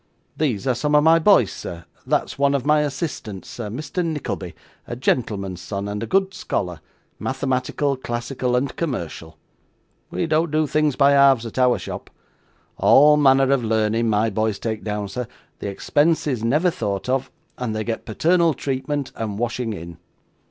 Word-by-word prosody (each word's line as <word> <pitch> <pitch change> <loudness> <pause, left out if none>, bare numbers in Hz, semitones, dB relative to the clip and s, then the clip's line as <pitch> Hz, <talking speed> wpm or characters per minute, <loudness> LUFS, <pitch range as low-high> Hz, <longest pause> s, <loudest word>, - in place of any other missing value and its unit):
These 130 -10 -1
are 130 - +2
some 145 +5 0
of 150 - +5
my 165 +1 +6
boys, 160 - +5
sir; 85 -1 -8 0.2
that's - - 0
one 140 0 +3
of 135 -2 -2
my 150 +1 +4
assistants, 135 - -4
sir 115 -4 -6
Mr. 150 - -3
Nickleby, 150 - -4 0.3
a - - -4
gentleman's 100 -7 -1
son, 100 +2 -4
and 105 0 -4
a 115 - -3
good 195 0 +1
scholar, 90 - -3 0.4
mathematical, 135 +1 -1
classical, 125 0 -2
and 130 +3 -1
commercial. 85 - -4 0.7
We - - -2
don't 160 +1 +1
do 155 +1 +1
things 150 -1 +1
by 140 0 +5
halves 140 -4 +5
at 115 +3 -5
our 125 -1 +4
shop. - - -7 0.7
All 150 +2 +6
manner 135 -2 +4
of 135 -3 +2
learning 110 +1 +1
my 110 +1 +2
boys 110 0 0
take 110 -2 -4
down, 105 -1 -3
sir; 120 +4 -5 0.3
the - - -4
expense 150 +10 +1
is 130 -7 -2
never 150 +10 +2
thought 100 -8 -3
of; 130 +1 0 0.3
and 120 -3 -2
they 110 - -1
get 115 0 -3
paternal 165 - +2
treatment 140 +1 -3
and 105 -3 -4
washing 120 0 -2
in. 85 -4 -8
125 Hz, 170 wpm, -22 LUFS, 110-145 Hz, 0.7 s, my